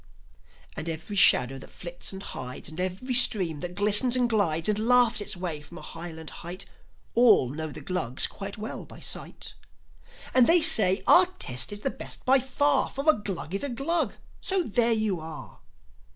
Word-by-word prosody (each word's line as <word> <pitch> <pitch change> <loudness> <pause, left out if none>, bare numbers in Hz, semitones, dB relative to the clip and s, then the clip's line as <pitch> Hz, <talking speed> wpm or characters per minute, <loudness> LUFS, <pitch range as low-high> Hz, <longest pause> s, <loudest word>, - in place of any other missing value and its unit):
And 165 - -5
every 165 +6 -6
shadow 135 -8 +5
that - - -13
flits 175 0 -6
and 190 0 -8
hides, 125 +2 -7
And 155 +2 -9
every 185 +8 -3
stream 190 - +4
that 175 +3 -6
glistens 210 +5 +5
and 250 -1 +1
glides 170 -8 0
And 210 0 0
laughs 235 -1 +3
its 205 -1 -2
way 170 -5 -5
from 160 +4 -12
a - - -11
highland 165 -1 -8
height, 175 +2 -7 0.5
All 230 - +4
know 155 +4 -6
the 150 0 -9
Glugs 140 -6 -1
quite 200 +1 -8
well 215 +1 -7
by - - -14
sight. - - -5 0.8
And 255 -2 +4
they 335 0 +4
say, 210 - +4
"Our 365 0 +6
test 130 - -2
is 205 0 -6
the 270 - -1
best - - -9
by 265 +1 +4
far; 275 +2 0
For 275 +3 -6
a 310 - +7
Glug 190 - -6
is 195 - -3
a 285 - -2
Glug; 300 +7 -2 0.3
so 380 -1 +1
there 235 -2 +2
you 215 -5 0
are! 160 -1 -10
200 Hz, 185 wpm, -26 LUFS, 165-245 Hz, 0.8 s, a